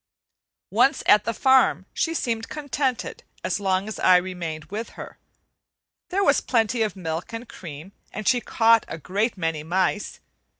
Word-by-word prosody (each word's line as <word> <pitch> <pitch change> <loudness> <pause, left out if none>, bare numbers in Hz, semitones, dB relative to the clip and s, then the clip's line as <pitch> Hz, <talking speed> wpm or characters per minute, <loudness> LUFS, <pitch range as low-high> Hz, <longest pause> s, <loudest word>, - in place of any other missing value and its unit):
Once 275 - +3
at 210 0 +5
the 230 - 0
farm 265 +2 +3
she 330 0 -1
seemed 225 -6 -2
contented 275 -4 -3 0.2
as - - -1
long 190 0 0
as 220 - -6
I 180 - +6
remained 175 -4 -4
with 220 +3 -5
her. - - -9 0.9
There 390 +2 +1
was - - +4
plenty 230 -1 +1
of 215 -2 0
milk 165 +2 -5
and 230 +1 -6
cream, 160 -1 -10 0.2
and 215 -1 -6
she 245 -2 +3
caught 230 -1 +4
a - - -6
great 200 - -1
many 165 -3 -2
mice. 185 +5 -1
210 Hz, 160 wpm, -24 LUFS, 180-240 Hz, 0.9 s, I